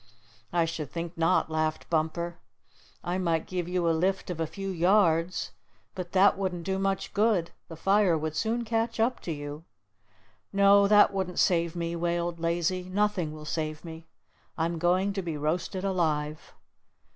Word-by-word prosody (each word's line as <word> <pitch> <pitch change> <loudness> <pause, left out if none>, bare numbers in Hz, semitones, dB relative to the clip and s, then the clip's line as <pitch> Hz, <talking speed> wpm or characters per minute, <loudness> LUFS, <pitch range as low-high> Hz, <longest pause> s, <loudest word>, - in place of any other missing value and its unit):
"I 170 -1 +2
should 165 -3 -4
think 170 0 -5
not," 165 0 +2
laughed 155 0 -1
Bumper. 170 +2 -1 0.6
"I 180 +2 -2
might 165 -3 0
give 180 -2 -3
you 180 -1 0
a - - +4
lift 185 +3 0
of 170 - -5
a 165 - 0
few 195 +4 -6
yards, 175 -1 +2 0.4
but 180 -2 -6
that 195 +1 +5
wouldn't 180 -3 -2
do 190 +2 -1
much 195 0 -1
good. 205 -5 +2 0.2
The 165 - -9
fire 195 0 +3
would 155 0 -3
soon 230 +4 -1
catch 225 +1 -1
up 235 +3 +1
to 170 - -5
you." 145 0 -6 0.9
"No, 200 0 +5
that 210 0 +6
wouldn't 190 -2 -3
save 170 -1 +2
me," 170 0 -2
wailed 170 0 -1
Lazy. 170 +2 0
"Nothing 195 -4 0
will 155 0 -9
save 155 0 -3
me. 160 0 -9 0.5
I'm 165 +1 -1
going 185 +4 +2
to 195 - -2
be 165 -4 -4
roasted 170 +5 -2
alive." 155 -5 -1
175 Hz, 165 wpm, -28 LUFS, 165-195 Hz, 0.9 s, that